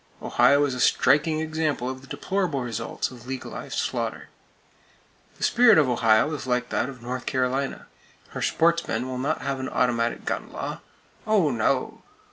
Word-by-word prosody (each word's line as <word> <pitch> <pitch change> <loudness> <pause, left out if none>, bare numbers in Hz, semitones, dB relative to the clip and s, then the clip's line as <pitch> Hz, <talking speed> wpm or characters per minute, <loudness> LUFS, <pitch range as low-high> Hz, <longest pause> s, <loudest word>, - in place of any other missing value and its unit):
Ohio 145 +1 +4
is 140 - -2
a 125 - -5
striking 155 +5 +3
example 155 -5 -1
of 130 0 -5
the 135 - -15
deplorable 160 0 -2
results 115 0 -3
of 120 -1 -13
legalized 130 -1 -6
slaughter. - - -3 1.1
The - - -7
spirit 235 -5 +6
of 150 -4 +5
Ohio 115 +3 +3
is 140 -3 -5
like 125 0 0
that 125 - -1
of 125 -3 -11
North 125 +1 -5
Carolina. 130 +1 -1 0.4
Her - - -6
"sportsmen" 165 -8 +1
will 130 -1 -4
not 135 - -1
have 140 -1 -2
an 130 - -4
automatic 120 -2 0
gun - - -3
law! - - -5 0.5
Oh, 200 -9 +3
no! 115 -3 0
130 Hz, 160 wpm, -25 LUFS, 125-155 Hz, 1.1 s, spirit